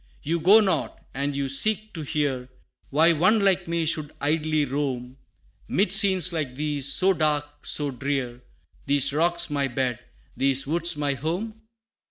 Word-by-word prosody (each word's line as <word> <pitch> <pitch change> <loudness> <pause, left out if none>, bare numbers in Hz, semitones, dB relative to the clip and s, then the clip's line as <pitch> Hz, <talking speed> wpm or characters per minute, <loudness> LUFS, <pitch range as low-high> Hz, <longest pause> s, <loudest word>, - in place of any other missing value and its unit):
You 165 +3 -1
go 200 +7 +6
not, 195 -3 -1
and 140 +1 -3
you 140 -1 -2
seek 215 +10 0
to 165 - -6
hear, 140 -4 -2 0.4
Why 160 +4 +4
one 185 +8 +3
like 190 -2 +1
me 170 -1 -1
should 155 -2 -1
idly 155 0 0
roam, 130 -2 -4 0.5
'Mid 200 +3 0
scenes 185 -3 +2
like 145 -6 -3
these, 145 -1 +1
so 190 +1 +5
dark, 145 -3 -2
so 145 -2 0
drear 125 -1 -4 0.5
These 140 0 +3
rocks 170 +1 0
my 140 -2 0
bed, 125 -2 -2 0.4
these 135 0 +2
woods 170 +2 0
my 145 -1 0
home? 180 - -4
150 Hz, 155 wpm, -24 LUFS, 140-170 Hz, 0.5 s, go